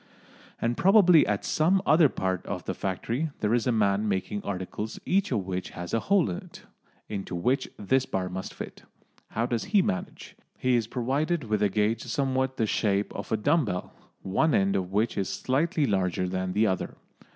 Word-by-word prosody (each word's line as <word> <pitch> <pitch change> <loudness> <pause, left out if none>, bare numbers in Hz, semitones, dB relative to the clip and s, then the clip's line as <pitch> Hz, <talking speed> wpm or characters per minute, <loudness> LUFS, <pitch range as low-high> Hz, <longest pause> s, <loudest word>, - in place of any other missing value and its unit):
And 120 +1 0
probably 185 -4 +6
at 105 -1 -1
some 175 +5 +3
other 155 0 +6
part 95 -4 -2
of - - -4
the - - -2
factory 115 - -2
there 105 +1 +1
is 120 +1 +1
a - - +3
man 105 -1 +2
making 100 +1 -2
articles 100 +3 -4
each 195 +1 +1
of 105 -6 0
which 90 -1 -3
has 90 0 -6
a 115 - +3
hole 190 - +2
in 85 - -3
it, - - -12 0.4
into 100 -3 -5
which 125 +11 0
this 130 +6 +1
bar 95 -1 -2
must 95 +1 -5
fit. - - -8 0.5
How 115 - -1
does 120 -2 -2
he 200 -1 +3
manage? 95 - -4 0.2
He 130 -1 +2
is 115 -2 +1
provided 140 +7 -1
with 105 -2 -1
a 105 - +3
gauge 105 +3 +1
somewhat 130 -2 -1
the 110 - +2
shape 100 -1 0
of - - -7
a 110 - +2
dumb 145 +7 +2
bell, 90 -4 -4 0.3
one 135 +11 +2
end 95 0 +2
of 95 -1 -2
which 105 +3 0
is 95 - -1
slightly 150 +4 0
larger 95 -4 0
than 95 0 -2
the 105 +3 +3
other. 95 -3 -2
110 Hz, 195 wpm, -27 LUFS, 95-135 Hz, 0.5 s, probably